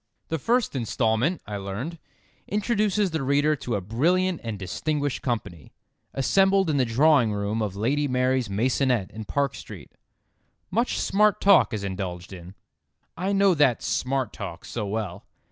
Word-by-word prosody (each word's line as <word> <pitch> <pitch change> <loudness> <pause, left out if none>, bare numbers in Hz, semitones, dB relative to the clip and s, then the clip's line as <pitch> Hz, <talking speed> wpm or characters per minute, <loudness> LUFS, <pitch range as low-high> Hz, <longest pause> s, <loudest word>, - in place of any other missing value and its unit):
"The 160 - -1
first 235 - +1
instalment," 120 - 0
I 105 -1 -5
learned, 105 - -5 0.5
"introduces 210 -2 +1
the 160 -2 -2
reader 145 +3 +2
to 120 -3 -3
a 100 - -2
brilliant 170 - +1
and 115 -3 -4
distinguished 145 - -2
company, 105 - -4 0.4
assembled 190 +5 +3
in 145 - 0
the 130 - +3
drawing 125 0 +4
room 105 +2 -2
of 105 -3 -2
Lady 140 +8 0
Mary's 130 -2 +1
maisonette 125 0 +1
in 110 0 -7
Park 140 +1 0
Street. - - -10 0.8
Much 235 +6 0
smart 210 +1 +2
talk 195 -9 +5
is 105 -3 -3
indulged 95 -2 -5
in." 90 +1 -11 0.6
I 185 +3 -2
know 195 -1 +4
that 145 -7 +2
"smart 130 -3 -1
talk" 85 +2 -7
so 110 -4 -4
well. 100 -3 -4
130 Hz, 150 wpm, -25 LUFS, 105-165 Hz, 0.8 s, talk